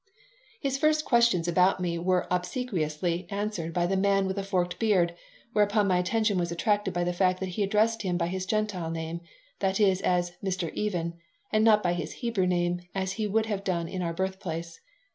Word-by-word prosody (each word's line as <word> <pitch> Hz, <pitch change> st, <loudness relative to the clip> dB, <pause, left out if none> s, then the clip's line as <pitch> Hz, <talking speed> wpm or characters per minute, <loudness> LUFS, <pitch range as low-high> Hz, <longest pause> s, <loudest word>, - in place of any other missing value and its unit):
His 275 Hz, -4 st, -1 dB
first 310 Hz, 0 st, +2 dB
questions 235 Hz, -9 st, +3 dB
about 180 Hz, +2 st, +3 dB
me 170 Hz, -2 st, -1 dB
were 180 Hz, +1 st, +1 dB
obsequiously 180 Hz, -3 st, -1 dB
answered 200 Hz, -5 st, -3 dB
by 175 Hz, +1 st, +1 dB
the 190 Hz, +2 st, 0 dB
man 195 Hz, 0 st, +2 dB
with 190 Hz, 0 st, -2 dB
the 200 Hz, -, -1 dB
forked 180 Hz, -2 st, -1 dB
beard, 185 Hz, -7 st, +3 dB, 0.4 s
whereupon 205 Hz, 0 st, +3 dB
my 180 Hz, -2 st, +3 dB
attention 205 Hz, +1 st, +1 dB
was 170 Hz, -1 st, -1 dB
attracted 205 Hz, +3 st, +1 dB
by 175 Hz, 0 st, -1 dB
the 175 Hz, 0 st, 0 dB
fact 185 Hz, 0 st, +2 dB
that 190 Hz, -, -3 dB
he 180 Hz, +4 st, -3 dB
addressed 215 Hz, +3 st, +2 dB
him 180 Hz, -3 st, -1 dB
by 170 Hz, -, 0 dB
his 185 Hz, +2 st, -3 dB
Gentile 205 Hz, -5 st, -1 dB
name 165 Hz, +1 st, -4 dB, 0.4 s
that 190 Hz, +1 st, 0 dB
is, 195 Hz, -3 st, +3 dB
as 175 Hz, -1 st, +1 dB
"Mr. 185 Hz, -4 st, -2 dB
Even," 170 Hz, -5 st, -2 dB, 0.3 s
and 215 Hz, 0 st, +3 dB
not 215 Hz, -2 st, +5 dB
by 175 Hz, -1 st, +2 dB
his 170 Hz, -3 st, -4 dB
Hebrew 230 Hz, -6 st, -1 dB
name, 175 Hz, 0 st, +1 dB, 0.2 s
as 190 Hz, -1 st, -1 dB
he 210 Hz, +2 st, -2 dB
would 220 Hz, +2 st, +1 dB
have 205 Hz, -3 st, -3 dB
done 170 Hz, -3 st, -1 dB
in 185 Hz, +2 st, -4 dB
our 170 Hz, -1 st, -1 dB
birthplace. 170 Hz, -3 st, -4 dB
185 Hz, 200 wpm, -28 LUFS, 175-210 Hz, 0.4 s, not